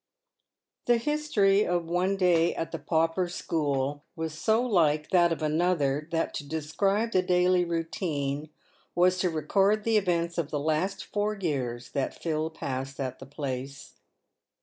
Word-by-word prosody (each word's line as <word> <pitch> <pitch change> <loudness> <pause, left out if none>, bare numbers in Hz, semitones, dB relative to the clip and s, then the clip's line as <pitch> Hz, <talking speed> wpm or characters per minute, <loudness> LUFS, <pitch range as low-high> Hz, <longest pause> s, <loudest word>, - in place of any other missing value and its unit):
The 240 -1 +4
history 230 -8 +2
of 175 -3 0
one 180 +4 0
day 175 -3 +3
at 165 - -3
the 165 - -4
pauper 165 +4 +1
school 145 -4 -1
was 160 -1 -4
so 220 +8 +2
like 155 -10 +2
that 175 -2 +4
of 165 -1 -2
another, 155 -2 +1
that 165 -1 -1
to - - -4
describe 195 +9 -1
the 185 - +3
daily 180 0 +3
routine 160 -4 -2 0.5
was 180 +1 +3
to 180 - +2
record 195 +7 +2
the 225 0 +3
events 170 -4 0
of 155 -3 -2
the 150 - -2
last 160 +6 -1
four 210 +1 -1
years 130 - -3
that 140 -2 -2
Phil 160 -1 -1
passed 135 -3 -5
at 130 -1 -4
the 135 - -10
place. 135 -1 -6
165 Hz, 150 wpm, -28 LUFS, 150-185 Hz, 0.5 s, The